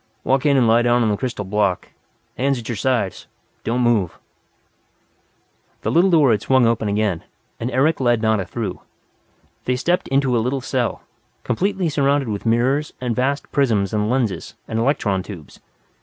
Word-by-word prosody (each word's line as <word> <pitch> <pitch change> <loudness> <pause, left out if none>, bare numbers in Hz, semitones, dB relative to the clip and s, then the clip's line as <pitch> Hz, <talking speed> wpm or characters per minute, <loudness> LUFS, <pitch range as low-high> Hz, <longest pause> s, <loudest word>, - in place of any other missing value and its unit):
Walk 135 +2 +1
in 140 -1 +4
and 125 -3 +4
lie 115 +1 +5
down 120 0 +3
on 110 - +2
the - - +1
crystal 120 -3 -4
block. 100 -1 0 0.5
Hands 135 +1 0
at 115 - -8
your 120 - -2
sides. 115 -3 -1 0.4
Don't 120 +2 0
move." 115 -8 +1 1.7
The - - 0
little 175 +4 +4
door 155 -8 +5
had 105 -3 +1
swung 130 -2 +3
open 115 -1 +1
again, 100 -4 0 0.4
and 115 - -2
Eric 135 +5 +2
led 120 -3 +2
Nada 110 -2 +1
through. 105 -4 -5 0.8
They 125 - +1
stepped 175 +8 0
into 135 -2 +1
a 115 - +2
little 130 +4 -1
cell, 125 -2 -2 0.4
completely 190 - 0
surrounded 140 -3 +1
with 105 +2 -4
mirrors 130 +6 +1
and 125 -2 -2
vast 140 +3 -1
prisms 110 -8 +1
and 105 0 0
lenses 120 -5 -1
and 110 - -2
electron 115 -6 +1
tubes. 90 -6 -11
120 Hz, 170 wpm, -21 LUFS, 110-135 Hz, 1.7 s, lie